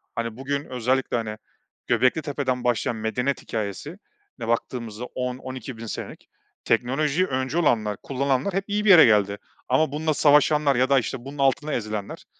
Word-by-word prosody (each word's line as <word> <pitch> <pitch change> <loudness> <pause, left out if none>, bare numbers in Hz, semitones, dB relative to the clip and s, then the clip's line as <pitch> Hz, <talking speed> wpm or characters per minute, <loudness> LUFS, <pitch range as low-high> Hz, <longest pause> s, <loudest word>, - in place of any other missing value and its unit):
Hani, 115 0 -3
bugün 140 +2 -3
özellikle, 125 0 0
hani, 110 -2 -4 0.5
Göbeklitepe'den 130 +1 0
başlayan 120 -1 0
medeniyet 125 +5 -2
hikâyesine 110 - -5 0.4
baktığımızda 115 -1 -3
10.000-12.000 125 -2 -6
senelik 110 - -7 0.4
teknolojiyi 140 +9 +1
öncü 130 +3 -2
olanlar 110 - +1
kullananlar 140 +6 -1
hep 195 +1 0
iyi 210 0 -1
bir - - +4
yere 175 -4 +10
geldi 100 -2 +3 0.3
ama 135 +4 +2
bununla 155 +2 0
savaşanlar 150 -1 +4
ya 130 +2 +2
da 140 -1 +5
işte 120 +2 -5
bunun 140 +2 -8
altında 140 +2 +1
ezilenler, 105 -3 -4
130 Hz, 140 wpm, -24 LUFS, 115-145 Hz, 0.5 s, yere